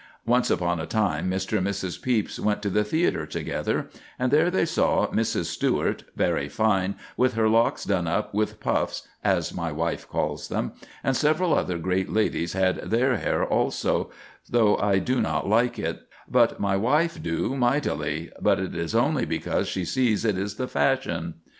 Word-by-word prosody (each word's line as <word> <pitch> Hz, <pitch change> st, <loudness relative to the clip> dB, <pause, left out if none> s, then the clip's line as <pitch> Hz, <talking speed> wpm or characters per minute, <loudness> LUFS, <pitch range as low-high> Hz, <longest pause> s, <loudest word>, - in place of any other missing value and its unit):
Once 120 Hz, +2 st, +2 dB
upon 85 Hz, -1 st, +1 dB
a 80 Hz, -, -4 dB
time, 105 Hz, -4 st, 0 dB
Mr. 95 Hz, +3 st, -1 dB
and 95 Hz, -, 0 dB
Mrs. 95 Hz, -3 st, -3 dB
Pepys 120 Hz, -5 st, 0 dB
went 105 Hz, 0 st, 0 dB
to 100 Hz, -, -1 dB
the 105 Hz, +3 st, +2 dB
theatre 160 Hz, +11 st, 0 dB
together, -, -, -2 dB, 0.3 s
and 125 Hz, 0 st, 0 dB
there 155 Hz, +4 st, +4 dB
they 180 Hz, -2 st, +2 dB
saw -, -, +2 dB
"Mrs. -, -, 0 dB
Stewart, -, -, -1 dB
very 70 Hz, 0 st, 0 dB
fine, 100 Hz, 0 st, +1 dB, 0.2 s
with 130 Hz, -1 st, +2 dB
her 110 Hz, -1 st, +3 dB
locks 115 Hz, +1 st, +2 dB
done 90 Hz, -4 st, 0 dB
up 105 Hz, +6 st, -1 dB
with 105 Hz, +1 st, -1 dB
puffs, -, -, -1 dB, 0.2 s
as -, -, +1 dB
my 85 Hz, -1 st, -3 dB
wife 80 Hz, +3 st, -3 dB
calls -, -, -2 dB
them, -, -, -2 dB, 0.3 s
and 135 Hz, -, +1 dB
several 155 Hz, +4 st, +2 dB
other 90 Hz, -, 0 dB
great 95 Hz, +2 st, -1 dB
ladies 95 Hz, -5 st, 0 dB
had 95 Hz, -1 st, +2 dB
their 125 Hz, +2 st, +1 dB
hair -, -, 0 dB, 0.2 s
so, -, -, -1 dB, 0.4 s
though 110 Hz, -4 st, +4 dB
I 100 Hz, -1 st, +2 dB
do 125 Hz, +6 st, +1 dB
not -, -, -1 dB
like 115 Hz, +4 st, +2 dB
it; -, -, -3 dB, 0.3 s
but -, -, +3 dB
my 100 Hz, -1 st, +1 dB
wife 150 Hz, +11 st, +1 dB
do 85 Hz, +10 st, -1 dB
mightily; 85 Hz, -, 0 dB
but -, -, +3 dB
it 95 Hz, -, -3 dB
is 85 Hz, +5 st, -3 dB
only 125 Hz, +1 st, +2 dB
because 80 Hz, -, -1 dB
she 95 Hz, -, -2 dB
sees 115 Hz, +1 st, +1 dB
it 105 Hz, -3 st, +2 dB
is 100 Hz, +2 st, -3 dB
the 130 Hz, -, -3 dB
fashion." 85 Hz, -14 st, 0 dB
105 Hz, 180 wpm, -25 LUFS, 90-125 Hz, 0.4 s, there